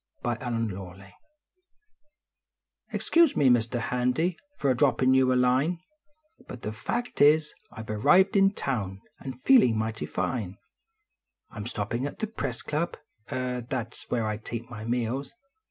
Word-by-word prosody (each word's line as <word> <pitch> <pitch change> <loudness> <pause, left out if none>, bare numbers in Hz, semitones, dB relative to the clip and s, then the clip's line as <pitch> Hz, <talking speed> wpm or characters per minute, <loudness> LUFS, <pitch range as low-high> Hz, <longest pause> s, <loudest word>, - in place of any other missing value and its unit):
tell? 120 - +1
NO 115 - -7
HARM 115 -2 -1
DONE 95 0 -9 1.8
Excuse 335 -3 +3
me, 140 -3 +4
Mr. 120 0 +1
Hand}, 125 +3 0 0.4
for 140 - +2
a - - +1
droppin 130 -1 +3
you 130 -1 +4
a - - +3
line, 130 +7 +2 0.7
Hut 125 - -9
the 105 - -3
fact 240 - -3
is, 150 +1 +5 0.2
I 110 - -8
ve 110 - -5
arrived 185 - +4
in 195 0 +6
town 100 -8 -3 0.2
and 130 -2 -8
feeling 230 - +6
mightv 110 0 -3
fine; 105 -7 -2 0.9
I - - -12
m 105 +1 -5
stoppin 120 +3 -2
at - - -8
the - - -1
Press 220 - -5
Club, 155 +3 -2 0.3
er 125 -1 -2
that 115 -3 -3
s - - -12
where 115 -2 0
I 105 -1 -2
take 115 +2 -7
my 110 -2 -7
meals. 125 +3 -2
125 Hz, 160 wpm, -27 LUFS, 110-140 Hz, 1.8 s, in